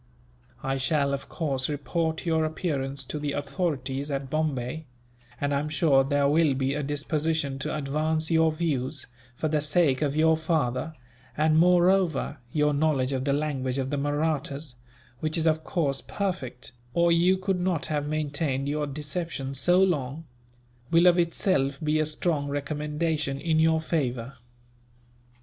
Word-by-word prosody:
I 135 Hz, 0 st, -1 dB
shall, 140 Hz, +1 st, +1 dB
of 140 Hz, -, -5 dB
course, 135 Hz, -5 st, -2 dB
report 160 Hz, +3 st, -2 dB
your 160 Hz, -2 st, +2 dB
appearance 140 Hz, -4 st, -2 dB
to 150 Hz, +3 st, -5 dB
the 145 Hz, -1 st, -2 dB
authorities 140 Hz, -2 st, -2 dB
at 135 Hz, -1 st, -3 dB
Bombay; 155 Hz, -1 st, -2 dB, 0.5 s
and 145 Hz, 0 st, 0 dB
I 140 Hz, -, +2 dB
am 150 Hz, +1 st, -3 dB
sure 145 Hz, -3 st, +3 dB
there 140 Hz, +1 st, +2 dB
will 150 Hz, -1 st, +3 dB
be 135 Hz, +1 st, 0 dB
a 150 Hz, -, -2 dB
disposition 145 Hz, 0 st, -1 dB
to 135 Hz, -, -2 dB
advance 155 Hz, +3 st, -1 dB
your 160 Hz, 0 st, +4 dB
views, 145 Hz, -4 st, -2 dB, 0.3 s
for 155 Hz, -, -1 dB
the 155 Hz, -1 st, +1 dB
sake 150 Hz, -3 st, +2 dB
of 145 Hz, -1 st, 0 dB
your 160 Hz, +1 st, +4 dB
father; 155 Hz, -2 st, -1 dB, 0.4 s
and 155 Hz, +1 st, +3 dB
moreover, 180 Hz, -3 st, +3 dB
your 150 Hz, 0 st, +2 dB
knowledge 140 Hz, -3 st, +1 dB
of 130 Hz, 0 st, -2 dB
the 140 Hz, -, +2 dB
language 140 Hz, -3 st, -1 dB
of 135 Hz, 0 st, -2 dB
the 145 Hz, -, 0 dB
Mahrattas 145 Hz, -1 st, -1 dB, 0.5 s
which 155 Hz, +1 st, 0 dB
is, 165 Hz, -, +1 dB
of 160 Hz, -1 st, +2 dB
course, 140 Hz, -7 st, -1 dB
perfect, 155 Hz, -13 st, -4 dB, 0.2 s
or 170 Hz, 0 st, +4 dB
you 175 Hz, +3 st, +4 dB
could 190 Hz, 0 st, -1 dB
not 180 Hz, -3 st, 0 dB
have 145 Hz, -1 st, -2 dB
maintained 145 Hz, -2 st, -1 dB
your 150 Hz, +1 st, -1 dB
deception 145 Hz, -1 st, -4 dB
so 175 Hz, +7 st, +4 dB
long 155 Hz, -3 st, -1 dB, 0.6 s
will 170 Hz, +1 st, +4 dB
of 175 Hz, 0 st, +6 dB
itself 155 Hz, -5 st, +1 dB
be 155 Hz, 0 st, +1 dB
a 155 Hz, -, +2 dB
strong 155 Hz, -2 st, -1 dB
recommendation 150 Hz, 0 st, -2 dB
in 160 Hz, +1 st, +1 dB
your 160 Hz, 0 st, +4 dB
favour." 135 Hz, -6 st, -2 dB
150 Hz, 155 wpm, -27 LUFS, 140-160 Hz, 0.6 s, of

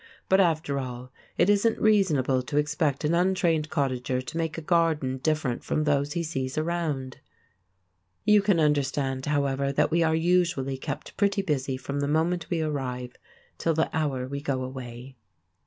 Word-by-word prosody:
But 190 Hz, -, +5 dB
after 155 Hz, -5 st, +1 dB
all, 125 Hz, -1 st, -6 dB, 0.3 s
it 175 Hz, -, +4 dB
isn't 205 Hz, +2 st, +3 dB
reasonable 155 Hz, -12 st, +3 dB
to 145 Hz, +3 st, -4 dB
expect 150 Hz, -1 st, 0 dB
an 150 Hz, +2 st, +1 dB
untrained 170 Hz, -3 st, +2 dB
cottager 130 Hz, -3 st, -1 dB
to 130 Hz, +5 st, -7 dB
make 165 Hz, -1 st, -2 dB
a -, -, -4 dB
garden 155 Hz, -6 st, +1 dB
different 150 Hz, -3 st, -1 dB
from 155 Hz, -, 0 dB
those 145 Hz, -1 st, +1 dB
he 170 Hz, -1 st, -1 dB
sees 135 Hz, -4 st, -3 dB
around. 155 Hz, -5 st, -2 dB, 1.1 s
You 210 Hz, -1 st, +6 dB
can 200 Hz, -4 st, +2 dB
understand, 140 Hz, -3 st, 0 dB
however, 140 Hz, -1 st, 0 dB
that 140 Hz, -, +1 dB
we 170 Hz, +1 st, +3 dB
are 160 Hz, -1 st, +3 dB
usually 160 Hz, -6 st, +1 dB
kept 145 Hz, +1 st, -6 dB
pretty 200 Hz, -1 st, +2 dB
busy 135 Hz, -6 st, -1 dB
from 140 Hz, +2 st, -4 dB
the 140 Hz, -, 0 dB
moment 160 Hz, +3 st, 0 dB
we 170 Hz, -2 st, 0 dB
arrive 125 Hz, -5 st, -3 dB, 0.5 s
till 165 Hz, -1 st, +1 dB
the 160 Hz, -, 0 dB
hour 135 Hz, -5 st, -1 dB
we 140 Hz, +1 st, -5 dB
go 135 Hz, -3 st, -2 dB
away. 130 Hz, 0 st, -8 dB
150 Hz, 165 wpm, -26 LUFS, 130-165 Hz, 1.1 s, You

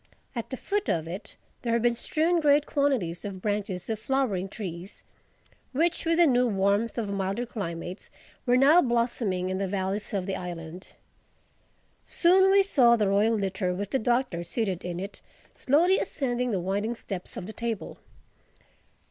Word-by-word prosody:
At 235 Hz, -, -4 dB
the 260 Hz, -, -4 dB
foot 410 Hz, +7 st, -2 dB
of 160 Hz, -1 st, 0 dB
it 195 Hz, +4 st, -7 dB, 0.3 s
there 235 Hz, -2 st, -1 dB
had 235 Hz, -1 st, +1 dB
been 240 Hz, 0 st, +4 dB
strewn 325 Hz, +8 st, +1 dB
great 295 Hz, -1 st, +4 dB
quantities 260 Hz, -, 0 dB
of 200 Hz, -2 st, -6 dB
branches 205 Hz, -2 st, -3 dB
of 220 Hz, -2 st, -2 dB
flowering 220 Hz, -7 st, 0 dB
trees, 185 Hz, -3 st, -7 dB, 0.7 s
which 335 Hz, +6 st, +1 dB
with 330 Hz, 0 st, +2 dB
the 345 Hz, -, +6 dB
new 250 Hz, -4 st, +3 dB
warmth 200 Hz, +2 st, +1 dB
of 215 Hz, -4 st, -2 dB
milder 195 Hz, +4 st, -2 dB
climates 180 Hz, -5 st, -6 dB, 0.4 s
were 245 Hz, +1 st, +5 dB
now 295 Hz, +7 st, +6 dB
blossoming 235 Hz, -, 0 dB
in 185 Hz, -, -2 dB
the 195 Hz, -, -1 dB
valleys 195 Hz, +3 st, -2 dB
of 195 Hz, -4 st, -2 dB
the 195 Hz, 0 st, -2 dB
island. 175 Hz, 0 st, -7 dB, 1.1 s
Soon 380 Hz, +2 st, +4 dB
we 395 Hz, 0 st, +6 dB
saw 250 Hz, -11 st, +5 dB
the 210 Hz, -4 st, +1 dB
royal 210 Hz, +3 st, +3 dB
litter, 190 Hz, -2 st, -1 dB
with 200 Hz, +1 st, -4 dB
the 265 Hz, -, +1 dB
Doctor 240 Hz, -6 st, 0 dB
seated 185 Hz, +1 st, -2 dB
in 175 Hz, -1 st, -4 dB
it, 195 Hz, +2 st, -7 dB, 0.3 s
slowly 340 Hz, +8 st, +3 dB
ascending 250 Hz, -3 st, -1 dB
the 200 Hz, -5 st, 0 dB
winding 200 Hz, +6 st, -1 dB
steps 195 Hz, -5 st, -7 dB
of 180 Hz, -, -5 dB
the 215 Hz, -, -7 dB
Table. 230 Hz, -3 st, -4 dB
215 Hz, 165 wpm, -27 LUFS, 190-255 Hz, 1.1 s, the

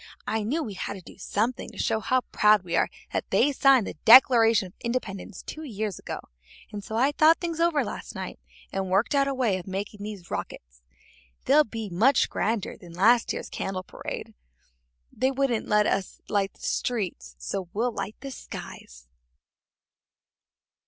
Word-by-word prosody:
I 220 Hz, -, -1 dB
knew 280 Hz, +10 st, -1 dB
we 215 Hz, -, -6 dB
had 190 Hz, -, -4 dB
to 190 Hz, -, -9 dB
do -, -, -15 dB
something 220 Hz, +6 st, -2 dB
to -, -, -14 dB
show 220 Hz, -, 0 dB
how 255 Hz, +3 st, +1 dB
proud 210 Hz, -2 st, +4 dB
we 175 Hz, -2 st, -3 dB
are -, -, +2 dB, 0.2 s
that -, -, -2 dB
they 290 Hz, -, +3 dB
signed 270 Hz, -4 st, +4 dB
the -, -, -5 dB
Declaration 230 Hz, -3 st, +7 dB
of 180 Hz, -, -12 dB
Independence 220 Hz, -7 st, -4 dB
two 310 Hz, -, -7 dB
years 215 Hz, -, -4 dB
ago, -, -, -6 dB, 0.5 s
and 205 Hz, -1 st, -6 dB
so 220 Hz, -, -6 dB
I 260 Hz, +5 st, +3 dB
thought 310 Hz, +2 st, +5 dB
things 335 Hz, -2 st, -3 dB
over 335 Hz, -3 st, +3 dB
last -, -, -7 dB
night -, -, -6 dB, 0.3 s
and 195 Hz, -1 st, -2 dB
worked 195 Hz, +8 st, +2 dB
out 275 Hz, -1 st, +3 dB
a 275 Hz, -, 0 dB
way 225 Hz, -8 st, +1 dB
of 175 Hz, -, -11 dB
making 200 Hz, +2 st, -5 dB
these 205 Hz, -4 st, -8 dB
rockets. -, -, -6 dB, 0.6 s
They'll 300 Hz, +2 st, +6 dB
be 225 Hz, -3 st, -6 dB
much 225 Hz, +9 st, +3 dB
grander 220 Hz, -2 st, -1 dB
than 175 Hz, -5 st, -13 dB
last 230 Hz, +7 st, +4 dB
year's -, -, -4 dB
candle 185 Hz, -1 st, -4 dB
parade. -, -, -7 dB, 0.8 s
They 260 Hz, +4 st, +1 dB
wouldn't 270 Hz, -4 st, 0 dB
let 210 Hz, 0 st, +3 dB
us 195 Hz, -2 st, -1 dB
light 200 Hz, -2 st, 0 dB
the -, -, -22 dB
streets, 185 Hz, -, -2 dB
so 170 Hz, -, -4 dB
we'll 230 Hz, +5 st, 0 dB
light 205 Hz, 0 st, -5 dB
the 275 Hz, -, -6 dB
skies." -, -, -10 dB
215 Hz, 175 wpm, -26 LUFS, 195-255 Hz, 0.8 s, Declaration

